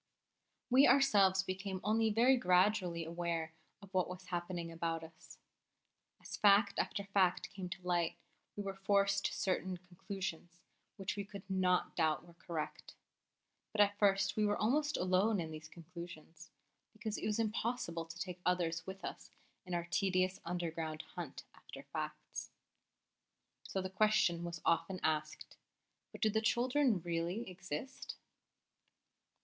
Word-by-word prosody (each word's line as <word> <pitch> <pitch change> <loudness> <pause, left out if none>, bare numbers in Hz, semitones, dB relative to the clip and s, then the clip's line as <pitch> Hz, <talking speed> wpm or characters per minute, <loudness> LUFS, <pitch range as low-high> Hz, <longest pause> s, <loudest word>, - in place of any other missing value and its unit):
We 265 +3 +8
ourselves 200 -9 +5
became 190 0 -3
only 220 +2 +3
very 235 +5 +5
gradually 180 -4 +3
aware 165 -1 -2 0.3
of 195 - -14
what 185 -1 +2
was 185 0 -7
happening 175 -1 -3
about 165 0 -2
us. 160 0 -13 0.8
As - - -7
fact 200 0 +5
after 200 - -1
fact 195 -3 +2
came 190 -2 -6
to 185 +1 -6
light, 175 -2 +1 0.4
we 205 - -3
were 195 -1 -3
forced 200 0 +2
to - - -6
certain 185 -1 -1
conclusions 180 -1 -6 0.4
which 195 -2 -3
we 200 - -3
could 200 -1 -10
not 185 -2 +1
doubt 160 -1 +1
were 170 - -15
correct. 170 -2 -5 0.8
But 210 - +3
at 205 0 +4
first 195 -1 +3
we 215 - +2
were 205 0 +2
almost 295 +7 +2
alone 185 +3 +3
in 160 -2 -3
these 155 0 -8
conclusions, 170 -1 -10 0.4
because 215 -1 -4
it - - -2
was 210 - 0
impossible 215 -6 -1
to 165 - -10
take 180 -2 -5
others 170 -2 0
with 190 0 -6
us - - -7 0.4
in 180 - -2
our 170 -1 -1
tedious 185 -1 +2
underground 165 -2 -3
hunt - - -6
after - - -11
facts. - - -5 1.1
So 190 - -3
the - - -1
question 200 -3 +3
was 170 -1 -5
often 185 +2 +2
asked: 155 -1 -1 0.5
"But - - -11
do 215 - +4
the 220 +1 +1
children 245 - +2
really 175 +6 -2
exist?" 190 - -6
185 Hz, 145 wpm, -36 LUFS, 170-205 Hz, 1.1 s, We